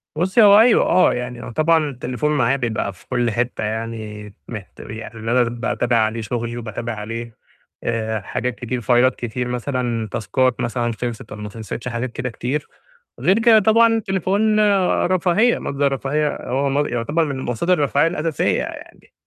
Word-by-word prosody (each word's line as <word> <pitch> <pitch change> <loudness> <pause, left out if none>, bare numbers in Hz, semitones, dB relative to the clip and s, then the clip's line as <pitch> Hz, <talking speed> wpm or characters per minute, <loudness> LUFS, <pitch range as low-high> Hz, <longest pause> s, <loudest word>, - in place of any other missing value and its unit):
بُصّي 190 +8 +2
هو 205 0 +8
أيوه، 230 +1 +5
آه، 185 - +4
يعني 125 -1 -5
هو - - -7
طبعًا 155 +2 +2
التليفون 130 +3 -2
معايا 135 -2 +2
بيبقى 110 -5 -2
في 90 - -21
كلّ 120 -2 0
حتّة 120 0 -2
يعني 110 -1 -5
مِهت 105 -5 -9
يعني 110 +2 -8
إن 110 - -4
أنا 125 +1 +4
باتابع 120 0 -1
عليه 110 +1 +1
شُغلي 120 +2 -3
وباتابع 115 0 -5
عليه 115 +1 -6 0.5
آآ 110 -2 -2
حاجات 125 +5 -3
كتير 125 0 -4
فايلات 125 +2 +3
كتير 120 +1 -4
مثلًا، 125 -2 -2
تاسكات 130 +2 0
مثلًا 120 0 -1
خِلصِت 120 -2 -4
والّا 105 0 -7
ما 105 - -5
خِلصِتش 115 +2 -7
حاجات 120 +1 -3
كده 125 +1 -4
كتير، 130 +5 -3 0.5
غير 190 +4 +3
كده 225 -1 +6
طبعًا 225 +3 +5
التليفون 205 +2 +1 0.5
رفاهية 185 +6 +2
مَصدَر 140 0 0
رفاهية، 145 +3 -1
هو 135 +2 +1
مص 145 +2 +1
يُعتبر 145 +8 0
من 140 -3 -4
مصادر 130 +8 0
الرفاهية 145 -1 +2
الأساسية 165 -3 0
يعني، - - -10
125 Hz, 165 wpm, -20 LUFS, 115-150 Hz, 0.5 s, هو